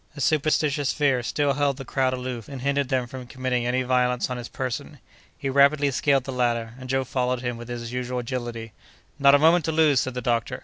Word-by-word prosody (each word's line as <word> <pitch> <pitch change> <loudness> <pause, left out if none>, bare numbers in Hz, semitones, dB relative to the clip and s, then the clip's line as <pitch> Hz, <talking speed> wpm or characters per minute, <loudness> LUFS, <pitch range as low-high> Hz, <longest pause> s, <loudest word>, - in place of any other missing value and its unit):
A - - -6
superstitious 150 -1 +1
fear 140 -4 +2
still 140 +3 0
held 140 -1 0
the 135 - -7
crowd 130 +1 0
aloof 125 -2 -5
and 135 -3 -7
hindered 140 -1 0
them 130 -2 +1
from 125 0 -9
committing 125 -1 -2
any 130 +1 +1
violence 125 0 +1
on 125 - -2
his 120 -1 -6
person. 135 +3 -5 0.4
He 140 - -4
rapidly 140 +1 +4
scaled 135 0 +2
the 135 - -5
ladder, 120 -3 -1
and 130 0 -9
Joe 135 0 +1
followed 125 -1 -1
him 120 -1 -3
with 120 0 -9
his 120 -1 -6
usual 125 0 -3
agility. 120 -2 -5 0.5
"Not 140 0 +7
a - - +7
moment 165 +3 +4
to 160 - 0
lose!" 155 -4 +4
said 130 -1 -2
the - - -2
doctor. 115 -1 -1
130 Hz, 220 wpm, -24 LUFS, 125-140 Hz, 0.5 s, Not